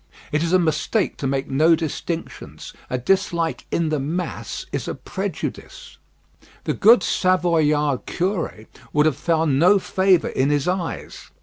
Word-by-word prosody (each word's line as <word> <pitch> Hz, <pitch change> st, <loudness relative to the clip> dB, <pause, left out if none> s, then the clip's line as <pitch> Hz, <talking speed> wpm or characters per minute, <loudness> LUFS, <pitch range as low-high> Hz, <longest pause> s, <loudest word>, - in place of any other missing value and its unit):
It 150 Hz, -, +1 dB
is 170 Hz, 0 st, -1 dB
a 185 Hz, -, +6 dB
mistake 170 Hz, +5 st, 0 dB
to 135 Hz, -, -2 dB
make 135 Hz, 0 st, -1 dB
no 155 Hz, +5 st, +4 dB
distinctions: 165 Hz, +1 st, -6 dB, 0.2 s
a 125 Hz, -, -1 dB
dislike 170 Hz, +3 st, 0 dB
in 165 Hz, -2 st, 0 dB
the 155 Hz, -1 st, 0 dB
mass 165 Hz, +7 st, -4 dB
is -, -, -3 dB
a -, -, -3 dB
prejudice. -, -, -6 dB, 0.6 s
The -, -, -1 dB
good 230 Hz, +3 st, +5 dB
Savoyard 155 Hz, -7 st, +1 dB
curé 180 Hz, -, -2 dB, 0.3 s
would 150 Hz, 0 st, +3 dB
have 155 Hz, -4 st, +2 dB
found 160 Hz, -5 st, +1 dB
no 185 Hz, +6 st, +6 dB
favour 190 Hz, -1 st, +2 dB
in 135 Hz, +2 st, 0 dB
his 145 Hz, 0 st, 0 dB
eyes. 180 Hz, -2 st, -4 dB
165 Hz, 145 wpm, -22 LUFS, 145-180 Hz, 0.6 s, a